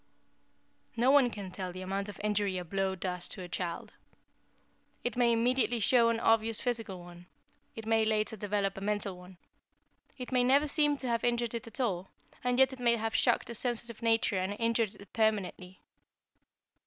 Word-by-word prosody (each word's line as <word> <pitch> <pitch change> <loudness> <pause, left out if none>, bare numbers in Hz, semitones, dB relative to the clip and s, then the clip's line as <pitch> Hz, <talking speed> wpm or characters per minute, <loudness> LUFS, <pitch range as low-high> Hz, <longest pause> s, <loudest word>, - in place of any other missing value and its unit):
"No 245 +3 +4
one 275 -3 +6
can 200 -5 -7
tell 185 -1 -5
the 185 +1 -7
amount 195 +2 -3
of 205 - -9
injury 205 -2 0
a 180 - -4
blow 195 +2 -1
does 180 -1 -4
to 185 - -6
a - - -7
child. 175 -1 -4 1.1
It 245 - -2
may 240 -1 +3
immediately 240 +1 +2
show 230 +2 +4
an 230 -1 0
obvious 225 -1 +2
physical 225 -7 -3
one; 175 0 -13 0.5
it 225 - -7
may 225 0 +3
later 215 0 0
develop 200 -1 -1
a - - -13
mental 205 -1 -2
one. 180 0 -14 0.8
It 250 -1 -7
may 250 -1 +3
never 275 +4 +4
seem 295 0 +2
to 260 - -4
have 235 -1 0
injured 240 -1 0
it 230 -1 -5
at 230 - -11
all, 190 -7 -1 0.3
and 250 0 +1
yet 265 0 +5
it 260 - -10
may 235 -1 +3
have 225 0 -2
shocked 240 - +2
a - - -4
sensitive 235 -1 -3
nature 225 -4 +2
and 190 +2 -1
injured 230 -2 +1
it 200 -2 -15
permanently. 195 -4 -1
220 Hz, 185 wpm, -31 LUFS, 195-240 Hz, 1.1 s, one